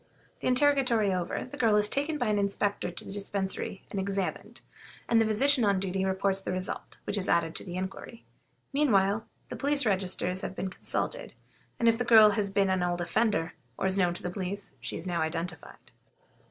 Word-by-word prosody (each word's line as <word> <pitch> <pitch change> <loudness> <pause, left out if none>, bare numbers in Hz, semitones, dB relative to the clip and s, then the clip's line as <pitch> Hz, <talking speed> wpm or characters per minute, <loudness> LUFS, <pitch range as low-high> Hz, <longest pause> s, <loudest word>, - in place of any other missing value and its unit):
The - - -3
interrogatory 255 -6 +3
over, 180 -2 -2
the 255 - -10
girl 225 -3 +3
is 210 0 +4
taken 285 +7 -1
by 245 -6 0
an 210 -1 +2
inspector 200 -1 0
to 175 - -8
the - - -8
Dispensary 195 -1 -3
and 200 - -2
examined, 195 -1 -3 0.5
and 230 -1 +4
the 225 - +2
physician 260 +4 +3
on 200 -2 +3
duty 190 0 -1
reports 190 0 0
the - - -4
result, 185 0 -5
which 205 - -2
is 190 - -2
added 165 -1 +2
to - - -2
the 175 -2 -7
inquiry. 190 +5 -6 0.5
Meanwhile, 220 -7 +2 0.2
the - - -5
police 285 -1 +2
registers 185 -2 0
have - - -5
been 190 -1 -3
consulted, - - -4 0.4
and 235 - +1
if 230 0 +4
the - - +1
girl 220 -3 +7
has 205 -1 0
been 195 -1 +2
an 185 -1 +1
old 175 0 0
offender, 175 -1 0 0.2
or - - -2
is 190 0 +2
known 175 -2 +2
to - - -8
the 180 - -3
police, 195 +2 -4
she - - -4
is 165 - -8
now 175 -2 -1
identified. 165 +1 -5
200 Hz, 200 wpm, -29 LUFS, 185-225 Hz, 0.5 s, girl